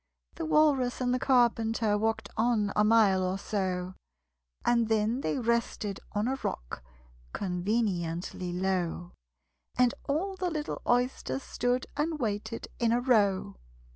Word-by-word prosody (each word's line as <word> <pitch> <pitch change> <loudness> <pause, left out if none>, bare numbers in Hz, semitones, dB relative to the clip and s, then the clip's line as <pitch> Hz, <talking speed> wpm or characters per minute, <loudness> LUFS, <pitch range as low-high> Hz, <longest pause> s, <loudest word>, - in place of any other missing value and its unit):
The 330 - -4
Walrus 290 -6 +3
and 250 -1 +1
the 255 - +1
Carpenter 230 -4 +2
Walked 220 +1 -1
on 220 -3 +1
a 210 - +4
mile 210 -3 +4
or 185 +1 -1
so, 185 -3 -2 0.7
And 235 -2 +3
then 220 +3 +1
they - - -1
rested 235 -4 -1
on 210 +2 0
a 270 +1 -1
rock - - -4 0.5
Conveniently 180 -2 -2
low: 180 -1 -1 0.7
And 250 -1 +4 0.2
all 370 +7 0
the 365 -1 -1
little 305 -3 -4
Oysters 250 +2 0
stood 245 +1 -1
And 310 +2 -1
waited 225 -2 -3
in 235 -1 +2
a 240 - +3
row. 205 - +2
225 Hz, 135 wpm, -29 LUFS, 195-250 Hz, 0.7 s, a